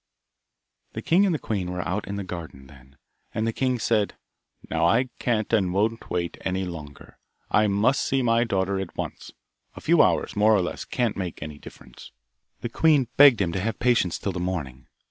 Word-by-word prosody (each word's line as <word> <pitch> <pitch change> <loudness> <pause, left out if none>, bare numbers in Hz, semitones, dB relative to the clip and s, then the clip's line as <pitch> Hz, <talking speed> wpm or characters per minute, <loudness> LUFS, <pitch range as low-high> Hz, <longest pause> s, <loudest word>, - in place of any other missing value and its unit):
The - - -6
king 190 +5 +4
and 175 - +1
the - - 0
queen 100 -9 -3
were 90 0 -4
out 100 +4 -2
in 100 - -4
the 100 - -4
garden 85 -7 -8
then, 65 0 -18 0.4
and 110 +1 0
the 115 - -1
king 130 0 0
said, 110 -2 0 0.5
'Now - - +1
I 125 +3 +2
can't 115 -2 -1
and 100 -4 +3
I - - -2
won't 110 +5 -1
wait 85 -1 -3
any 95 0 -2
longer. 75 -5 -10 0.3
I 105 0 +4
must 105 +7 +2
see 135 -1 0
my 115 0 +3
daughter 95 -3 -1
at 95 -2 -6
once. - - -6 0.4
A - - -8
few - - +4
hours, - - +1
more 105 +1 +4
or 100 - +3
less, 90 - -5
can't 120 -4 -1
make 90 -5 -5
any 75 -1 -8
difference.' 60 - -13 0.5
The 120 - -3
queen 145 -2 +3
begged 140 -7 +7
him 85 -3 0
to 95 - -2
have 110 +3 -2
patience 120 -8 +2
till 100 - -3
the 90 - -5
morning. 75 -9 -4
100 Hz, 205 wpm, -25 LUFS, 90-115 Hz, 0.5 s, begged